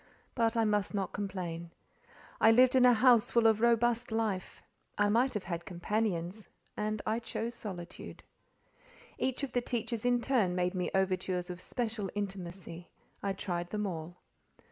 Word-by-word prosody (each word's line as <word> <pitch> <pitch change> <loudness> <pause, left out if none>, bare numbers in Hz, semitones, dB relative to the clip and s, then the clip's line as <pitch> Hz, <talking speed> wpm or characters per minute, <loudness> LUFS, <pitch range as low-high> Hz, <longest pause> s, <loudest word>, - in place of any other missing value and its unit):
But 230 -1 +1
I 225 - +3
must 210 -1 0
not 195 -2 -2
complain. 180 -4 -4 0.7
I - - +6
lived 250 +2 +6
in 255 -1 +6
a 245 - +7
house 240 -1 +5
full 235 -1 +3
of 220 -1 +4
robust 235 0 +2
life; 220 -5 -2 0.3
I 205 0 +3
might 240 +4 +2
have 205 - -2
had 170 -1 -4
companions, 190 +1 -2 0.3
and 215 0 -2
I 220 +2 0
chose 235 0 -4
solitude. 180 -7 -8 1.0
Each 260 +2 -1
of 280 - -2
the 245 - +1
teachers 235 -2 -3
in 245 0 +3
turn 235 -8 +1
made 180 0 0
me 180 -1 -1
overtures 185 -1 0
of 180 0 -8
special 220 -4 -3
intimacy; 185 -3 -6 0.3
I 200 -1 -1
tried 175 -2 -3
them 210 +1 -2
all. 175 -1 -5
210 Hz, 160 wpm, -32 LUFS, 180-230 Hz, 1.0 s, a